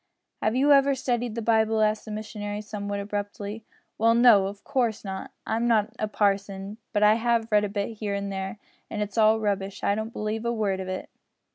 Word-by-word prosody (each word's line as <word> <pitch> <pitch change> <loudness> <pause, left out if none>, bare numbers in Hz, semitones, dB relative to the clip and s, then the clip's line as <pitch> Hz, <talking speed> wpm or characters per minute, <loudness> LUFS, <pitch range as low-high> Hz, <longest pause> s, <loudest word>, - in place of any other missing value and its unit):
"Have 215 +2 +1
you 280 +3 +4
ever 275 0 +5
studied 245 -3 -1
the 230 - -3
Bible?" 220 0 +3
asked 215 0 +1
the 215 - -7
missionary, 210 -1 -5
somewhat 205 -1 -4
abruptly. 205 +1 -5 0.3
"Well, 230 +1 +4
no, 230 -5 +6
of 200 +1 -8
course 240 -7 -1
not. 190 -1 -5 0.2
I'm 230 +2 0
not 220 -2 +2
a 215 - 0
parson, 200 0 -1
but 210 -2 +1
I 210 0 +7
have 230 0 0
read 210 0 +4
a - - -3
bit 205 +2 -3
here 205 -2 -2
and 200 0 -3
there, 190 +2 -4 0.3
an' 210 - -3
it's 210 +2 -2
all 220 0 +5
rubbish. 200 -2 -2
I 200 - +3
don't 220 +2 -3
believe 215 0 -3
a 235 - 0
word 205 -5 0
of 190 - -5
it." 185 0 -5
215 Hz, 210 wpm, -26 LUFS, 200-225 Hz, 0.3 s, I